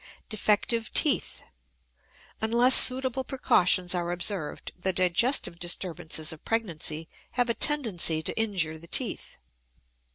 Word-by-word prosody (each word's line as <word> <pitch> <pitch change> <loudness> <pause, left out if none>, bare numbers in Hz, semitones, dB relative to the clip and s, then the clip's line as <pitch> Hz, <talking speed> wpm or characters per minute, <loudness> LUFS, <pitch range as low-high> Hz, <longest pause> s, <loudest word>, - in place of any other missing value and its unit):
DEFECTIVE 215 +1 -1
TEETH. 295 - +2 1.0
Unless 235 +4 +4
suitable 260 0 +4
precautions 185 -9 +1
are 175 -1 -3
observed, 175 -3 -3
the 190 +1 -2
digestive 185 +2 +1
disturbances 165 -3 -2
of 155 - -15
pregnancy 165 -8 -3 0.3
have 245 -1 0
a - - -1
tendency 210 - +1
to - - -5
injure 185 -8 -2
the 170 - -14
teeth. - - -3
190 Hz, 110 wpm, -26 LUFS, 170-235 Hz, 1.0 s, Unless